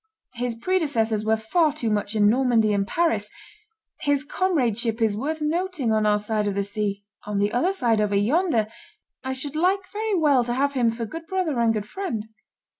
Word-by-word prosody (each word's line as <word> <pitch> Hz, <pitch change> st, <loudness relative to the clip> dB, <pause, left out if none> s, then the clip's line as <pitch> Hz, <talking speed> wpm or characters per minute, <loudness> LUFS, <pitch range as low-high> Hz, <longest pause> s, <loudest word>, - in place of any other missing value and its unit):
His 245 Hz, -1 st, -3 dB
predecessors 230 Hz, -, 0 dB
were 220 Hz, +1 st, +2 dB
far 300 Hz, +8 st, +1 dB
too 235 Hz, -7 st, -2 dB
much 205 Hz, 0 st, -1 dB
in 205 Hz, -1 st, +4 dB
Normandy 230 Hz, -2 st, +3 dB
and 200 Hz, -1 st, 0 dB
Paris; 225 Hz, -12 st, 0 dB, 0.7 s
his 285 Hz, -1 st, +1 dB
comradeship 245 Hz, -, 0 dB
is 220 Hz, -3 st, +2 dB
worth 305 Hz, +8 st, -3 dB
nothing 325 Hz, -5 st, -1 dB
on 215 Hz, -1 st, +2 dB
our 210 Hz, 0 st, +4 dB
side 210 Hz, 0 st, -1 dB
of 200 Hz, -, -1 dB
the 200 Hz, -, 0 dB
sea; 200 Hz, 0 st, -3 dB, 0.2 s
on 210 Hz, -1 st, -2 dB
the 205 Hz, +1 st, +1 dB
other 295 Hz, +11 st, +2 dB
side, 235 Hz, -, +1 dB
over 205 Hz, -1 st, 0 dB
yonder, 235 Hz, -, +2 dB, 0.6 s
I 260 Hz, 0 st, -2 dB
should 280 Hz, +2 st, -4 dB
like 370 Hz, +4 st, +1 dB
very 430 Hz, 0 st, -1 dB
well 290 Hz, -7 st, +3 dB
to 240 Hz, 0 st, -2 dB
have 280 Hz, +2 st, +1 dB
him 245 Hz, -4 st, +2 dB
for 230 Hz, 0 st, -3 dB
good 325 Hz, +8 st, -8 dB
brother 345 Hz, -8 st, -1 dB
and 230 Hz, -1 st, +3 dB
good 215 Hz, -2 st, -2 dB
friend." 225 Hz, -, -4 dB
235 Hz, 190 wpm, -24 LUFS, 215-315 Hz, 0.7 s, in